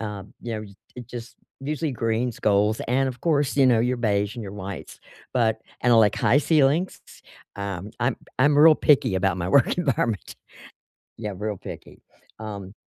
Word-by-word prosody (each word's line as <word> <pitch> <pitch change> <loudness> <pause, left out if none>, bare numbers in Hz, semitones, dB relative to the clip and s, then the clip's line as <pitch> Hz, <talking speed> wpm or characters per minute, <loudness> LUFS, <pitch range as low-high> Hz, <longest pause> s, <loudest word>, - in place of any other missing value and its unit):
Um, 105 -3 -7
you 120 - -4
know, 110 - -4
y 100 -2 -12 0.2
it 125 -2 -8
just 120 -2 -9 0.2
usually 150 +1 -2
greens, 115 0 -1
golds, 105 +1 +2
and, 135 +2 +2
of 125 -2 -5
course, 145 -4 +1
you 135 - +5
know, 120 -3 +4
your 125 +1 0
beige 105 -1 0
and 120 - -6
your 95 - -7
whites, 100 -2 -8 0.3
but 110 -3 +1 0.2
and 120 0 +3
I - - +6
like 110 -2 +5
high 120 +7 +3
ceilings, 155 +3 +2
s - - -16 0.3
um, 100 0 -5
I'm 120 +2 +1 0.2
I'm 145 +3 +4
real 155 +1 +8
picky 145 -10 +3
about 95 -1 +1
my 90 0 -2
work 140 - +4
environment. 120 - -1 0.8
Yeah, 105 -2 -4
real 105 +1 -3
picky. - - -10 0.4
Um 100 -3 -7
115 Hz, 180 wpm, -24 LUFS, 105-135 Hz, 0.8 s, real